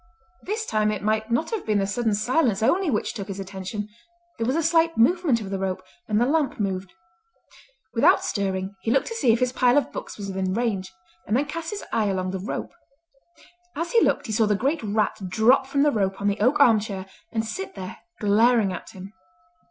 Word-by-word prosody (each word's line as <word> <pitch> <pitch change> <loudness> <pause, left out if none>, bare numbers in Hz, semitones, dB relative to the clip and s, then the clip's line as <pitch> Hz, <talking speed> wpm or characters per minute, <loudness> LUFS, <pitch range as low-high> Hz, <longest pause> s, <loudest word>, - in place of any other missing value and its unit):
This 435 +3 -3
time 215 - +1
it 210 -2 -4
might 215 +1 0
not 240 +8 0
have 445 -3 -2
been 215 -1 +1
the 195 - +1
sudden 220 +2 0
silence 225 -1 +1
only 350 +9 +2
which 215 -6 -1
took 200 -4 -6
his 195 -1 -6
attention; 195 +2 -5 0.5
there 225 - 0
was 260 - +1
a 330 - +1
slight 330 +1 +2
movement 300 +1 +3
of 195 -2 -7
the 195 - -2
rope, 185 -1 -2 0.2
and 210 0 +1
the 240 - +3
lamp 290 -2 0
moved. 190 -2 -2 1.0
Without - - +4
stirring, 190 -1 -2
he - - -2
looked 270 +4 +3
to - - -4
see 260 - +3
if 225 - +2
his 250 0 0
pile 250 +1 +3
of 285 - +1
books - - -7
was 200 -2 -6
within 190 0 -2
range, 215 -6 -1 0.4
and 215 - +2
then 285 - +1
cast 330 +3 -5
his 415 -1 -5
eye 220 -2 +2
along 185 -1 -1
the 190 - -4
rope. 200 +7 -4 1.0
As 335 +3 -3
he 465 - +5
looked - - +2
he 225 - -5
saw 220 0 +2
the 210 - +2
great 275 +10 0
rat 215 0 0
drop 235 +7 +4
from 280 +1 +1
the 295 - +4
rope 195 -4 -1
on 200 - -4
the 200 +1 0
oak 250 +7 +3
arm 225 -3 +6
chair 195 -3 -5 0.3
and 225 -1 -1
sit 200 -3 -5
there 185 -2 -7 0.2
glaring 215 0 +3
at 180 - -9
him. 190 +2 -10
220 Hz, 220 wpm, -24 LUFS, 195-265 Hz, 1.0 s, arm